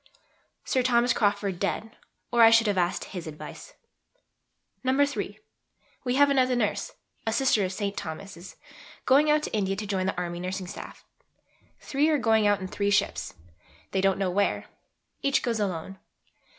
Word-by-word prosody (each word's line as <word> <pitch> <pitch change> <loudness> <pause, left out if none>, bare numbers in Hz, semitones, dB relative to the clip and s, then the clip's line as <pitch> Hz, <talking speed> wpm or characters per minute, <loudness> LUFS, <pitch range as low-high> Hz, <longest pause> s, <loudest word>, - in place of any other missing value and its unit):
Sir 260 - +1
Thomas 245 -1 +3
Crawford 200 -3 0
dead, 220 +3 -2 0.4
or 235 - +3
I 225 - +9
should 230 0 +5
have 205 -2 +1
asked 175 -1 0
his 180 -4 -7
advice. 155 - -9 1.1
(iii.) 280 +2 0 0.6
We 250 -1 0
have 285 +1 +5
another 255 -2 +3
Nurse 220 -4 -1 0.3
(a - - +2
Sister 230 -2 +2
of 185 - -1
St. 200 0 -3
Thomas's) 175 +2 -7 0.5
going 285 +3 +5
out 300 0 +3
to - - -5
India 195 -2 0
to 210 - -5
join 190 -2 -1
the 190 - -2
Army 175 -1 -3
Nursing 185 +1 -4
Staff. 180 - -9 0.8
Three 290 +3 +1
are 310 - +3
going 220 -4 +3
out 205 -1 +3
in 185 - -5
three 200 +2 -1
ships 205 0 0 0.6
they 190 - +1
don't 195 0 +2
know 190 -2 0
where 200 +2 0 0.6
each 275 0 +1
goes 235 -3 -1
alone. 190 -1 -3
205 Hz, 165 wpm, -27 LUFS, 190-250 Hz, 1.1 s, I